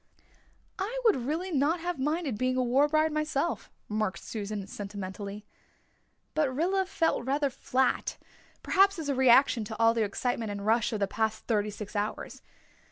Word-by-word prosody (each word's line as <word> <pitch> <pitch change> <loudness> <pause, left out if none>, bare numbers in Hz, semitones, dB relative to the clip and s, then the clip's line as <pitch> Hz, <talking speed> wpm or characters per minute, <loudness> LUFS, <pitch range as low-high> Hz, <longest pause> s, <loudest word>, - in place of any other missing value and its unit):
"I 445 +6 -2
would 445 - +6
really 345 +6 -2
not 305 +3 +2
have 345 -2 -3
minded 300 -2 -1
being 255 +3 0
a 255 - +2
war 260 +4 +3
bride 310 +1 +2
myself," 305 +1 -1 0.2
remarked 215 -3 -1
Susan 210 -2 -4
sentimentally. 200 0 -7 0.9
But 300 -4 +1
Rilla 370 +7 0
felt 325 -8 0
rather 280 +2 0
flat 255 +1 0 0.5
perhaps 390 0 +4
as 310 -3 -4
a - - +2
reaction 255 -2 +5
to 220 +1 -6
all 230 0 +5
the 230 - 0
excitement 225 +2 -2
and 200 0 -5
rush 225 +2 +2
of 215 -2 -3
the 200 - +2
past 220 +1 -2
thirty 210 -2 +1
six 210 0 -8
hours. 205 +1 -3
255 Hz, 165 wpm, -29 LUFS, 215-310 Hz, 0.9 s, would